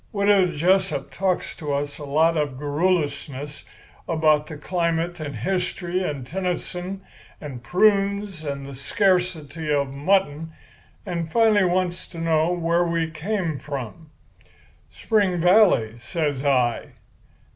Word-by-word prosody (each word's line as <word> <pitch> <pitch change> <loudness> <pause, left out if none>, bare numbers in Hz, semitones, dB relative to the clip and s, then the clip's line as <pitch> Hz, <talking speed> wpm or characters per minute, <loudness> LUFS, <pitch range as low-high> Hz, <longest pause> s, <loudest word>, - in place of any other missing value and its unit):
"Widow 200 -3 +4
Jessup 185 +4 +1
talks 190 -2 -1
to 150 -2 -4
us 145 +1 -2
a 145 - -6
lot 160 +4 +3
of 145 -4 -1
garrulousness 145 -2 -1 0.5
about 155 -2 +3
the 155 - -7
climate 170 +1 -1
and 145 -2 -5
history 180 -1 -2
and 145 -8 -3
Tennyson 180 +3 -4 0.4
and 135 -5 -8
prunes 200 - +1
and 140 -2 -4
the 140 - -8
scarcity 165 0 0
of 140 -2 0
mutton, 160 0 0 0.5
and 170 -4 -3
finally 220 -2 +4
wants 180 0 -1
to 170 - -12
know 165 0 +2
where 170 0 +1
we 165 -1 -1
came 165 -2 -2
from. 145 +3 -7 0.8
"'Spring 200 -5 +1
Valley,' 175 - +4
says 145 0 -2
I. 125 -4 +1
165 Hz, 125 wpm, -23 LUFS, 145-185 Hz, 0.8 s, Widow